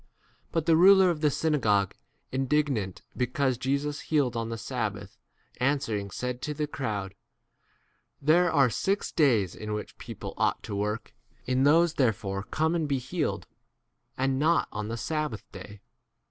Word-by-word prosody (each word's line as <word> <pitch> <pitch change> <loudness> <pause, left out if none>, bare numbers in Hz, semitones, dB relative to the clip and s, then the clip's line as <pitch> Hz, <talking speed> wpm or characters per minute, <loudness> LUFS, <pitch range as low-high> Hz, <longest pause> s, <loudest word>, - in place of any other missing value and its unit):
But 165 -2 0
the 165 - +5
ruler 190 +2 +7
of 155 -3 -4
the 150 - +4
synagogue, 115 - +1 0.4
indignant 130 -7 0
because 130 -1 0
Jesus 140 +3 -1
healed 140 -6 0
on 115 -1 -2
the 115 - -4
sabbath, 105 -5 -4 0.4
an 140 +4 +2
swering 105 -6 -3
said 125 +5 -4
to 150 - -3
the 150 +1 -1
crowd, 105 -10 -4 1.1
There 165 +4 +4
are 140 -5 +4
six 195 - -1
days 115 - +3
in 105 0 -5
which 105 - -6
[people] - - -7
ought - - +1
to 100 - -5
work; 105 +3 -3 0.3
in 130 +2 +2
these 165 +3 +5
therefore 105 -7 0
come 160 +10 0
and 165 -3 0
be 140 -1 +1
healed, 150 +5 -2 0.7
and 135 0 +1
not 165 +3 +3
on 105 0 -4
the 115 +1 -4
sab 155 +1 -2
15 105 - -5
bath - - -33 0.2
day. 100 -1 -13
130 Hz, 160 wpm, -28 LUFS, 110-150 Hz, 1.1 s, ruler